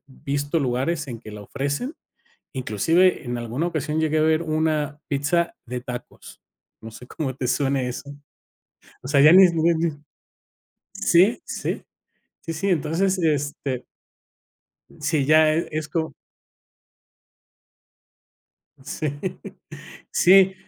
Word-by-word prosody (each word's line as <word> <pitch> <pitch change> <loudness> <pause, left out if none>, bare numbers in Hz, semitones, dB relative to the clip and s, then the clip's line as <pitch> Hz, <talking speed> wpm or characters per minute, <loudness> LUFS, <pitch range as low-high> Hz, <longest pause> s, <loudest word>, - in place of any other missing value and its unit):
visto 140 +3 -2
lugares 140 +4 -1
en 120 -3 -6
que 110 - -11
la 105 0 -9
ofrecen. 140 - -3 0.6
Inclusive, 160 - +2
en 120 -1 -3
alguna 120 +8 -2
ocasión 155 -1 -2
llegué 155 0 +1
a - - +3
ver 160 +1 +3
una 155 -2 -1
pizza 145 +5 0
de 125 +1 -4
tacos. 125 -1 -9 0.4
No 110 - -9
sé 125 +3 -12
cómo 135 -4 -4
te 130 -1 -3
suene 135 0 0
eso. 130 +3 -6 0.9
O 130 - -8
sea, 145 - +3
ya 150 +4 +8
ni 190 +1 +9
ni 170 0 +2
ni 165 0 0 1.0
Sí, 190 +8 +4
sí. - - -4 0.6
Sí, 165 - -5
sí, 180 +5 -2
entonces, 180 +3 +1
este 145 -5 -1 1.1
Sí, 150 -1 +1
ya 155 +1 +5
e 165 +2 -1
es 155 0 -3
como 160 +1 -2 2.7
Sí. 145 +2 -3 1.0
Sí, 190 +1 +5
155 Hz, 120 wpm, -23 LUFS, 135-165 Hz, 2.7 s, ni